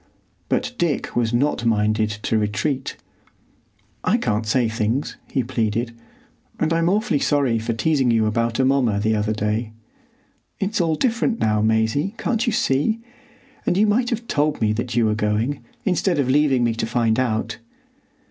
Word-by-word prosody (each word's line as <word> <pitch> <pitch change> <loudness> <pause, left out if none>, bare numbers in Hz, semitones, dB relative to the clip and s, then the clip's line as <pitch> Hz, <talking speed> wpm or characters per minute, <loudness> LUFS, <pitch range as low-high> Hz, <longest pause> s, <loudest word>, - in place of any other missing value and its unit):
But 250 - 0
Dick 170 -4 -1
was 115 -2 +1
not 120 +1 +1
minded 110 -1 +1
to - - 0
retreat. 105 +7 -2 1.1
"I - - +3
can't 110 +1 -1
say 120 +1 +2
things," 115 +4 -1 0.2
he 130 - +1
pleaded, 115 -1 -2 0.6
"and 160 +1 +1
I'm 165 +1 +2
awfully 200 -7 +1
sorry 135 -7 +1
for 115 +1 -2
teasing 135 +2 +1
you 115 -2 +3
about 115 +2 0
Amomma 130 -6 +2
the 110 +1 +1
other 105 0 0
day. 105 +1 -2 0.9
It's 200 0 0
all 165 -2 +1
different 235 - 0
now, 105 -1 +2
Maisie, 110 - +1
can't 235 +1 -1
you - - +3
see? 215 +4 +1 0.6
And 180 - +1
you 210 - +4
might 235 +4 +2
have 235 -1 -3
told 150 0 0
me 105 -1 +2
that 120 +1 -3
you 120 -1 +3
were 110 - +2
going, 110 +6 -1 0.2
instead 180 -1 +1
of 140 -3 +1
leaving 135 -2 +3
me 115 -1 +2
to 115 0 -2
find 115 -1 +1
out." 110 -2 -1
120 Hz, 165 wpm, -22 LUFS, 110-150 Hz, 1.1 s, you